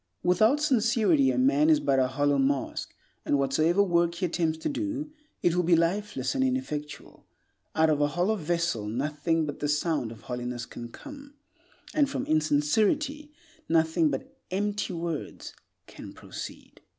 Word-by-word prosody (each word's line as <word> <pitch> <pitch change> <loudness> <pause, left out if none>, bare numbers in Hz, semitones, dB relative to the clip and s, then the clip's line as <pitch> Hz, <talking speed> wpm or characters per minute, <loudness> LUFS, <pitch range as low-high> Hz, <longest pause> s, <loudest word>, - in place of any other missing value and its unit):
Without 215 +10 +4
sincerity 265 0 +3
a - - 0
man 290 +4 +3
is 310 -2 +5
but 135 - +2
a 130 - +3
hollow 145 +2 +1
mask, 135 0 -1 0.3
and 145 - +1
whatsoever 155 +8 +2
work 170 -2 +1
he 180 - -1
attempts 165 -2 0
to 160 - -4
do, 300 0 -3 0.3
it 175 - +3
will 180 - +2
be 175 0 +4
lifeless 195 +6 0
and 270 -1 +1
ineffectual. 255 - -4 0.5
Out 160 0 +4
of 150 -1 +1
a 145 - +4
hollow 175 +8 0
vessel 170 - -1
nothing 150 +7 -1
but 145 - -6
the 145 - -1
sound 150 -5 0
of 115 - -11
hollowness 125 -1 -5
can 120 0 -9
come; 285 - -12 0.6
and 290 -2 +3
from - - -3
insincerity 210 - +1 0.4
nothing 160 0 +3
but 135 -2 -5
empty 205 +2 -2
words 165 -3 -5 0.3
can - - -11
proceed. - - -9
170 Hz, 155 wpm, -27 LUFS, 145-230 Hz, 0.6 s, is